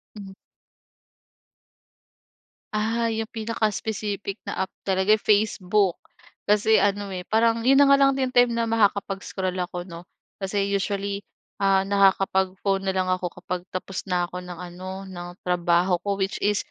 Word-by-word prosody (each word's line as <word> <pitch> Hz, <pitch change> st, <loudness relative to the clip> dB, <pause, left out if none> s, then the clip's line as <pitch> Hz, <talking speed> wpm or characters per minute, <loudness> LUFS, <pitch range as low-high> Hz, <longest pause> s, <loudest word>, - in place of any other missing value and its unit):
Hmm. 195 Hz, -2 st, -9 dB, 2.4 s
Ah, 225 Hz, +2 st, 0 dB
yung 225 Hz, -1 st, -2 dB
pinaka-specific 215 Hz, -2 st, -3 dB
na 190 Hz, -, -2 dB
app -, -, -47 dB
talaga, 190 Hz, +2 st, +3 dB
eh, 215 Hz, -, -8 dB
Facebook. 205 Hz, -2 st, +2 dB, 0.5 s
Kasi 210 Hz, +1 st, +3 dB
ano, 205 Hz, 0 st, +1 dB
eh, 180 Hz, -, -5 dB
parang 230 Hz, +2 st, +2 dB
yun 270 Hz, +2 st, +5 dB
na 285 Hz, -, +7 dB
nga 275 Hz, -, +7 dB
lang 275 Hz, 0 st, +5 dB
din 260 Hz, -1 st, 0 dB
time 245 Hz, -1 st, +4 dB
na 230 Hz, 0 st, 0 dB
makakapag-scroll 200 Hz, -3 st, 0 dB
ako, 180 Hz, 0 st, -4 dB
'no? 170 Hz, 0 st, -9 dB, 0.3 s
Kasi 200 Hz, 0 st, -1 dB
usually, 200 Hz, 0 st, -2 dB, 0.4 s
ah, 195 Hz, 0 st, +3 dB
nakakapag-phone 195 Hz, -1 st, +2 dB
na 190 Hz, -, 0 dB
lang 185 Hz, -1 st, -1 dB
ako 185 Hz, -1 st, -1 dB
kapag 180 Hz, -1 st, -4 dB
tapos 185 Hz, +1 st, -5 dB
na 180 Hz, -2 st, 0 dB
ako 180 Hz, +1 st, -7 dB
ng 180 Hz, -1 st, -9 dB
ano, 185 Hz, +2 st, -7 dB
ng 175 Hz, -1 st, -7 dB, 0.2 s
trabaho 175 Hz, +1 st, +2 dB
ko, 200 Hz, -1 st, -1 dB
which 195 Hz, 0 st, -1 dB
is, 205 Hz, 0 st, +1 dB
195 Hz, 145 wpm, -24 LUFS, 185-215 Hz, 2.4 s, na